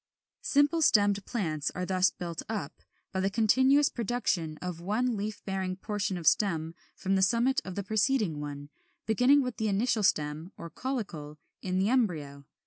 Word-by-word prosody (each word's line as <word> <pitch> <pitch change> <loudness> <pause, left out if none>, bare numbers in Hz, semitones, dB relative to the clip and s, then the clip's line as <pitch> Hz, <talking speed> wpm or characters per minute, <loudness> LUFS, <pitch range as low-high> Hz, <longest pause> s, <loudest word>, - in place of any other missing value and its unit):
=Simple 290 +4 +2
stemmed 205 -7 +4
Plants= 155 -10 -2
are 180 - -2
thus 185 0 +3
built 170 -2 -6
up, 195 -9 -5 0.3
by 190 - -2
the 195 +1 +1
continuous 260 +7 +4
production 200 -9 -2
of 180 -2 -5
one 225 +6 0
leaf 210 +1 -5
bearing 190 -1 -2
portion 195 -1 -3
of 170 - -7
stem 165 -5 +2 0.2
from 190 - -2
the 190 - +2
summit 240 +8 +2
of 185 - -7
the 200 - -3
preceding 215 - +1
one, 145 0 -7 0.3
beginning 250 +6 +4
with 250 -2 -4
the 220 - -1
initial 215 +3 +1
stem 155 -1 0
(or 170 - -8
caulicle) 175 - -5 0.2
in 185 -1 -2
the 195 +3 +2
embryo. 155 - -1
195 Hz, 165 wpm, -29 LUFS, 170-230 Hz, 0.3 s, stemmed